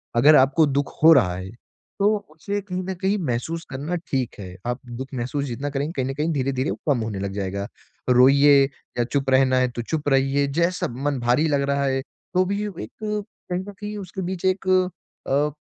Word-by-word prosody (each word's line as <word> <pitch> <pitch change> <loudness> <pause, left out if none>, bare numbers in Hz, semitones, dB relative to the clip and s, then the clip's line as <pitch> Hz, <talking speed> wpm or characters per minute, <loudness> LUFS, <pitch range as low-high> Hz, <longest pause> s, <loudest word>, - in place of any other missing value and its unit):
अगर 145 +6 +7
आपको 135 +4 +5
दुख 140 0 -1
हो 160 - +9
रहा 90 - +4
है, 95 +1 -6 0.5
तो 210 +2 +3
उसे 200 +6 -3
कहीं 185 -2 -4
न 190 +1 -3
कहीं 195 +2 +2
महसूस 150 +7 -2
करना 145 +6 -3
ठीक 130 -4 -1
है, 90 -2 -8
आप 120 +1 -2
दुख 125 +3 -6
महसूस 130 +3 -2
जितना 135 +2 -4
करेंगे, 140 +2 -2
कहीं 130 - +1
न - - -2
कहीं 155 +3 0
धीरे-धीरे 135 -1 -1
वो - - -4
कम 130 - +2
होने 110 -3 -4
लग 100 0 -3
जाएगा। 100 0 -3 0.4
रोइए 140 +3 +6 0.3
या 120 - +3
चुप 135 +2 -1
रहना 130 -1 +4
है 130 0 +3
तो 120 - -4
चुप 150 +4 -2
रहिए, 135 +1 +2
जैसा 170 +5 0
मन 135 +3 -2
भारी 125 +6 +2
लग 145 -2 +1
रहा 140 0 +1
है 135 -1 0
तो 185 +6 -2
भी 200 +2 -1
अब 200 - -8
एक 110 - -6
कहीं 210 -4 -4
न - - -5 0.2
कहीं 210 0 -5
उसके 190 -1 -6
बीच 185 0 -4
एक 185 0 0
अ, 180 -6 0
140 Hz, 205 wpm, -23 LUFS, 130-175 Hz, 0.5 s, हो